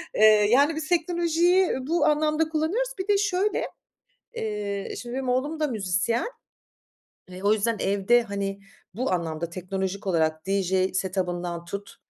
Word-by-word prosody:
Iıı, 215 Hz, -1 st, +6 dB
yani, 285 Hz, +6 st, +4 dB
biz 310 Hz, 0 st, -4 dB
teknolojiyi 345 Hz, +1 st, +2 dB, 0.2 s
bu 340 Hz, +3 st, +2 dB
anlamda 305 Hz, +1 st, +2 dB
kullanıyoruz. 340 Hz, +11 st, 0 dB
Bir 375 Hz, -, -3 dB
de 410 Hz, -1 st, +4 dB
şöyle, 405 Hz, 0 st, 0 dB, 0.7 s
eee, 205 Hz, -2 st, -3 dB
şimdi, 240 Hz, 0 st, -7 dB
benim 265 Hz, -1 st, -2 dB
oğlum 285 Hz, +6 st, 0 dB
da 305 Hz, -, +1 dB
müzisyen. 210 Hz, -, 0 dB, 1.0 s
Eee, 185 Hz, 0 st, -9 dB
o 205 Hz, -, +4 dB
yüzden 220 Hz, +2 st, +1 dB
evde, 200 Hz, +5 st, +3 dB
hani, 200 Hz, -2 st, -4 dB, 0.3 s
bu 245 Hz, +1 st, -1 dB
anlamda, 165 Hz, -1 st, -2 dB
teknolojik 190 Hz, +2 st, -4 dB
olarak 160 Hz, -2 st, 0 dB
DJ 190 Hz, -1 st, +1 dB
set 190 Hz, 0 st, -2 dB
up'ından 175 Hz, -1 st, -2 dB
tut, 200 Hz, +3 st, -7 dB
215 Hz, 145 wpm, -25 LUFS, 190-310 Hz, 1.0 s, Iıı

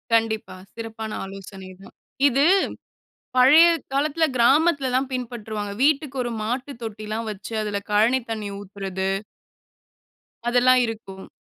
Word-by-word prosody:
கண்டிப்பா. 220 Hz, -3 st, 0 dB, 0.2 s
சிறப்பான 225 Hz, -1 st, -6 dB
ஆலோசனை 195 Hz, -1 st, -10 dB
தான். -, -, -14 dB, 0.3 s
இது 275 Hz, +2 st, +2 dB, 0.9 s
பழைய 285 Hz, +7 st, +8 dB, 0.3 s
காலத்தில 305 Hz, +3 st, +2 dB
கிராமத்தில 275 Hz, +3 st, +3 dB
தான் 265 Hz, +1 st, +1 dB
பின்பற்றுவாங்க. 220 Hz, -4 st, -4 dB
வீட்டுக்கு 285 Hz, -2 st, +2 dB
ஒரு 240 Hz, -, -3 dB
மாட்டு 250 Hz, +6 st, -3 dB
தொட்டிலாம் 215 Hz, 0 st, -5 dB
வைச்சு 210 Hz, +2 st, -7 dB
அதுல 205 Hz, -1 st, -2 dB
கழனி 225 Hz, +5 st, +4 dB
தண்ணி 215 Hz, -2 st, -3 dB
ஊத்துறது. 195 Hz, -1 st, -4 dB, 1.4 s
அதெல்லாம் 250 Hz, +1 st, +5 dB
இருக்கும். 205 Hz, -4 st, -8 dB
225 Hz, 110 wpm, -23 LUFS, 210-260 Hz, 1.4 s, பழைய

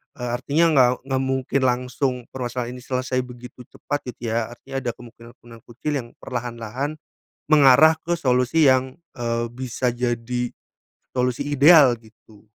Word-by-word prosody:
eee, 125 Hz, -1 st, -5 dB
artinya 145 Hz, +6 st, +2 dB
nggak 130 Hz, -4 st, +5 dB
nggak 135 Hz, -1 st, -1 dB
mungkin 130 Hz, 0 st, -1 dB
langsung 125 Hz, +2 st, -1 dB, 0.2 s
permasalahan 125 Hz, -1 st, -4 dB
ini 125 Hz, -, -9 dB
selesai 130 Hz, 0 st, -2 dB
begitu 125 Hz, 0 st, -12 dB
cepat 145 Hz, 0 st, -3 dB, 0.2 s
gitu 115 Hz, -2 st, -5 dB
ya, 115 Hz, -1 st, 0 dB
artinya 135 Hz, +3 st, -6 dB
ada 125 Hz, -2 st, -3 dB
kemungkinan-kemungkinan 115 Hz, -1 st, -15 dB
kecil 135 Hz, +6 st, -4 dB
yang 120 Hz, -, -8 dB
perlahan-lahan 120 Hz, +3 st, -5 dB, 0.5 s
mengarah 150 Hz, +1 st, +6 dB
ke 170 Hz, 0 st, -1 dB
solusi 125 Hz, +4 st, +2 dB
yang, 130 Hz, +3 st, +2 dB, 0.2 s
eee, 115 Hz, -1 st, -2 dB
bisa 125 Hz, -1 st, -2 dB
jadi 120 Hz, 0 st, -2 dB, 0.7 s
solusi 125 Hz, -1 st, 0 dB
ideal, 145 Hz, -3 st, +6 dB
gitu. 110 Hz, -1 st, -21 dB
125 Hz, 140 wpm, -22 LUFS, 120-135 Hz, 0.7 s, mengarah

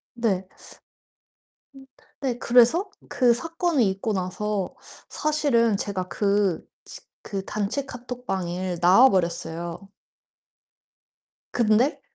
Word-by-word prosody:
네. 205 Hz, -6 st, 0 dB, 1.3 s
음 270 Hz, 0 st, -13 dB, 0.4 s
네 255 Hz, -4 st, -1 dB
그래서 250 Hz, -, +4 dB, 0.2 s
그 245 Hz, -3 st, +3 dB
사건이 325 Hz, -, 0 dB
있고 195 Hz, +3 st, -3 dB
나서 190 Hz, +1 st, -2 dB, 0.4 s
사실은 280 Hz, -8 st, +1 dB
제가 195 Hz, -2 st, -3 dB
그-치 200 Hz, -3 st, -2 dB, 0.2 s
그 195 Hz, -2 st, -5 dB
단체 210 Hz, +8 st, -3 dB
카톡방을 190 Hz, -9 st, -4 dB
나와 190 Hz, +10 st, +7 dB
버렸어요. 170 Hz, -2 st, -2 dB, 1.8 s
근데 235 Hz, +5 st, +2 dB
215 Hz, 180 characters per minute, -24 LUFS, 185-250 Hz, 1.8 s, 나와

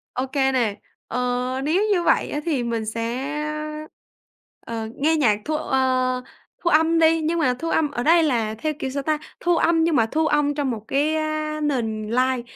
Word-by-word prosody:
Ô 255 Hz, -, -1 dB
kê 270 Hz, 0 st, +1 dB
nè, 235 Hz, -6 st, 0 dB, 0.3 s
ờ, -, -, -4 dB, 0.5 s
nếu 335 Hz, +8 st, +2 dB
như 355 Hz, -3 st, +1 dB
vậy -, -, +2 dB
á, 295 Hz, -, -2 dB
thì 290 Hz, -7 st, 0 dB
mình 230 Hz, -2 st, -2 dB
sẽ, 235 Hz, +6 st, -3 dB, 1.3 s
ờ, 225 Hz, -1 st, -4 dB
nghe 315 Hz, +3 st, +2 dB
nhạc 225 Hz, -9 st, +2 dB
thu 310 Hz, -, -1 dB
ờ, 255 Hz, -2 st, 0 dB, 0.4 s
thu 345 Hz, -, +2 dB
âm 325 Hz, +1 st, +4 dB
đi, 325 Hz, 0 st, +4 dB
nhưng 330 Hz, +2 st, 0 dB
mà 255 Hz, -6 st, +2 dB
thu 330 Hz, -, -3 dB
âm 305 Hz, -3 st, +1 dB
ở 240 Hz, -, -3 dB
đây 330 Hz, +3 st, +5 dB
là 230 Hz, -7 st, 0 dB
theo 305 Hz, +7 st, -2 dB
kiểu 265 Hz, -, -2 dB
sao 275 Hz, +1 st, -3 dB
ta, 310 Hz, +1 st, +1 dB, 0.2 s
thu 345 Hz, -1 st, +2 dB
âm 330 Hz, -1 st, +3 dB
nhưng 330 Hz, -2 st, +2 dB
mà 225 Hz, -, +4 dB
thu 315 Hz, +7 st, 0 dB
âm 295 Hz, -1 st, +1 dB
trong 285 Hz, -2 st, -1 dB
một 220 Hz, -1 st, -6 dB
cái 295 Hz, +3 st, +1 dB
á 310 Hz, 0 st, -2 dB
nền 230 Hz, -7 st, -1 dB
live. 255 Hz, +1 st, +1 dB
285 Hz, 200 wpm, -23 LUFS, 245-315 Hz, 1.3 s, đây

